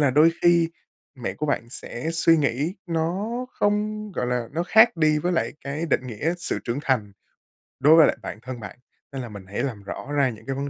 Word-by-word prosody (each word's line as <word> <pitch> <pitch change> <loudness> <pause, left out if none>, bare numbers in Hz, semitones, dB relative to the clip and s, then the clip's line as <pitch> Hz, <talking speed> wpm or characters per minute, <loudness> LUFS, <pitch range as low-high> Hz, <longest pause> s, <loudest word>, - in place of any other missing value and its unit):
là 145 -3 +4
đôi 155 +5 +6
khi 170 -1 +4 0.4
mẹ 125 -2 -4
của 150 - -3
bạn 120 -5 -1
sẽ 130 +4 -5
suy 165 0 +4
nghĩ 145 +4 0
nó 170 +5 -1 0.2
không 210 0 -1
gọi 125 - -2
là, 125 -2 -1
nó 170 +2 0
khác 220 +1 +5
đi 155 -1 +3
với 175 +4 -1
lại 170 - 0
cái 150 +4 -3
định 130 -3 0
nghĩa 145 +9 -2
sự - - -2
trưởng 120 +3 -2
thành 110 -8 0 0.7
đối 150 +4 +7
với 160 -2 +8
lại - - 0
bản 105 - -7
thân 125 -1 -7
bạn. 105 - -9 0.3
Nên 135 -1 -4
là 120 - -7
mình 100 -2 -10
hãy 100 - -3
làm 115 -8 -4
rõ 140 +8 -7
ra 140 -3 +3
những 110 -2 -10
cái 135 0 -3
vấn 140 +1 -3
145 Hz, 225 wpm, -24 LUFS, 125-165 Hz, 0.7 s, với